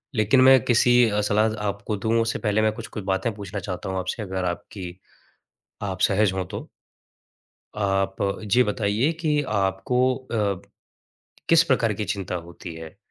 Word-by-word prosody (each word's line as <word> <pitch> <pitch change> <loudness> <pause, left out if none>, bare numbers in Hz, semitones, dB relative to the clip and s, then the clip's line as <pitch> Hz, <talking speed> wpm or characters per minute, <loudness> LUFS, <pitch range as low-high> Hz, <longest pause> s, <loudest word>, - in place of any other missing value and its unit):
लेकिन 110 +5 +4
मैं 130 0 +8
किसी 120 0 +4 0.2
अ, 105 0 0
सलाह 105 +1 +2
आपको 100 +1 -3
दूँ 115 +3 +1
उससे 115 0 -1
पहले 105 -1 +1
मैं 110 0 +3
कुछ-कुछ 105 -1 -7
बातें 95 +3 -1
पूछना 100 -1 -6
चाहता 90 0 -5
हूँ 95 0 -2
आपसे 95 +4 -3
अगर 95 -1 -3
आपकी 90 +1 -6 0.8
आप 95 -2 -4
सहज 100 0 +3
हो 95 -1 -1
तो? - - -7 1.1
आप 95 -1 0
अ, 100 +1 -1
जे 120 +5 +4
बताइए 105 +7 0
कि 150 -3 +1
आपको 105 +6 +1
अ, 105 -7 -2 0.9
किस 165 0 +6
प्रकार 120 -7 +1
की 105 +1 -3
चिंता 95 -3 -3
होती 85 0 -8
है? 80 +3 -10
105 Hz, 160 wpm, -24 LUFS, 95-115 Hz, 1.1 s, मैं